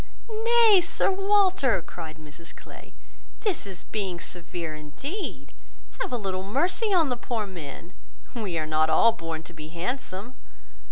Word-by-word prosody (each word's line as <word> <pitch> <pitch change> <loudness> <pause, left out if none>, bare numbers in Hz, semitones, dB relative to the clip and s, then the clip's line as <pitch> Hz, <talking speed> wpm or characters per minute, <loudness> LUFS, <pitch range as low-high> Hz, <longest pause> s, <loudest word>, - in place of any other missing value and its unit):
"Nay, 460 -4 +7
Sir 345 - +2
Walter," 385 - +4
cried 160 -2 -8
Mrs 155 +2 -11
Clay, - - -13 0.5
"this 395 - 0
is 190 -2 -6
being 190 -5 -3
severe 170 -2 -5
indeed. 155 - -6 0.5
Have - - -1
a 245 - 0
little 190 -4 -2
mercy 345 - +1
on 335 -7 +4
the 250 - +1
poor 235 -2 -2
men. 170 -2 -9 0.4
We 205 -8 -2
are 155 - -1
not 155 0 +2
all 230 +7 +6
born 165 -6 -5
to 165 - -11
be 155 -1 -8
handsome. 195 - -4
195 Hz, 150 wpm, -27 LUFS, -, 0.5 s, Nay